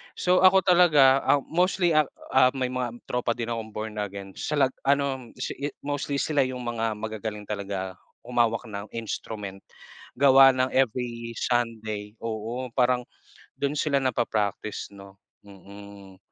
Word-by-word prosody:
So 180 0 +2
ako 190 0 +6
talaga, 150 -7 +6
ah, 140 - +4
mostly, 180 +1 +1
ah, 155 -3 +4 0.2
ah, 130 0 +4
may 130 -1 -1
mga 120 -2 -4
tropa 120 -1 -1
din 120 -1 -4
akong 115 -1 -4
Born 110 0 -5
Again 100 -1 -5
sa 150 - -2
lag 135 -2 +3 0.2
ano 140 -3 0
si - - -3
yu 145 +1 -2
mostly 145 0 -2
sila 150 -2 0
yung 125 -1 -6
mga 115 -2 -2
magagaling 110 -1 -5
talaga 100 -2 -4 0.3
humawak 120 -1 +1
ng 100 -1 -6
instrument. 105 -3 -5 0.6
Gawa 135 0 +7
ng 130 0 +1
every 120 -2 -1
Sunday, 110 -4 -2
oo, 115 +3 -4
parang 125 -1 +2 0.5
dun 140 0 -1
sila 145 -2 +1
napa-practice, 110 -5 -2
no? 100 0 -13 0.3
Mm. 100 0 -13
120 Hz, 145 wpm, -26 LUFS, 105-135 Hz, 0.6 s, Gawa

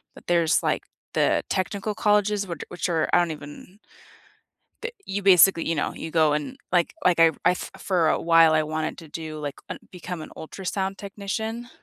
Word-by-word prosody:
but - - -16
there's, 170 -2 +3
like, - - 0 0.3
the - - +2
technical 200 +2 -2
colleges, 210 -1 +2
which 170 -4 -6
a - - -14
which 180 - -3
are, 160 -2 +1
I - - +7
don't 170 -2 +1
even 150 +6 -11 1.0
that 475 0 -4
you 200 +1 -3
basically 185 -3 +6
you 165 - +1
know, 150 - -1
you 160 - -6
go 155 -2 +3
and, 150 - -3 0.2
like 175 - +2
like 175 -2 +4
I 165 -1 +7
I 180 - +5
f - - -6
for 175 -5 +1
a - - +1
while, 165 -1 +5
I 155 - +3
wanted 155 +1 -3
to 160 - -11
do, 155 -1 -6
like 145 -2 -5
un - - -5
become 180 -2 -6
an - - -10
ultrasound 190 +3 -4
technician, 220 +4 -5
175 Hz, 200 wpm, -25 LUFS, 160-195 Hz, 1.0 s, I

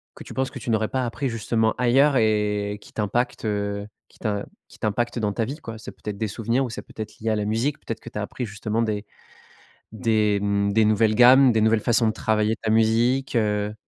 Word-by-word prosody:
que - - -10
tu - - -10
penses 130 0 -1
que 130 - -8
tu 120 - -6
n'aurais 110 -1 +1
pas 130 -1 -1
appris, 130 +3 -2
justement, 110 -1 0
ailleurs 135 +3 +4
et 105 -2 +1
qui - - -16
t'impactent, 120 +4 -1
heu, 100 -1 -2 0.2
qui - - -23
t'im 105 -3 -2 0.2
qui - - -17
t'impactent 120 +3 -1
dans 105 -2 -1
ta 115 - -1
vie, 140 +6 -5
quoi? 115 -8 -8
C'est 110 - -9
peut-être 105 -1 -7
des 110 - -1
souvenirs 115 +5 -1
ou - - -5
c'est 110 - -6
peut-être 110 0 -9
lié 115 - -2
à 110 - +2
la 105 -1 -1
musique, 115 +7 -1
peut-être - - -6
que - - -10
tu - - -8
as - - -2
appris 125 - -5
justement 105 +1 -2
des 105 -2 -2 0.9
des, 110 -2 +1
mmh, 100 0 +1
des 110 - +4
nouvelles 110 0 +3
gammes, 125 +3 +7
des 110 - +2
nouvelles 110 0 +3
façons 115 0 +2
de 110 - +1
travailler 110 0 0
ta 110 - -5
musique, 115 +5 +2
heu? 105 -1 0
110 Hz, 230 wpm, -24 LUFS, 105-120 Hz, 0.9 s, gammes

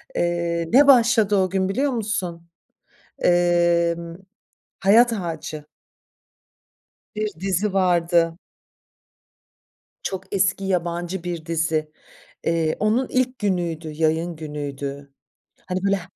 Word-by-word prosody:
Eee, 170 -1 -1
ne 280 +3 +7
başladı 235 -5 +5
o 190 -1 +2
gün 190 0 0
biliyor 270 +8 0
musun? 185 -8 -3 0.7
Emm, 170 -1 +2 0.7
Hayat 230 +5 +5
Ağacı. 160 -6 -5 1.5
Bir 215 0 -1
dizi 195 +2 -1
vardı. 170 -3 +2 1.7
Çok 190 - -5
eski 195 0 +1
yabancı 175 -1 -2
bir 170 -3 -5
dizi. 160 -2 -1 0.5
Eee, 165 -1 0
onun 225 +5 +1
ilk 255 0 0
günüydü, 175 -5 -2
yayın 160 +2 0
günüydü. 145 -2 -6 0.5
Hani, 185 0 -3
böyle, 200 0 +3
he 185 - -7
175 Hz, 100 wpm, -22 LUFS, 165-195 Hz, 1.7 s, ne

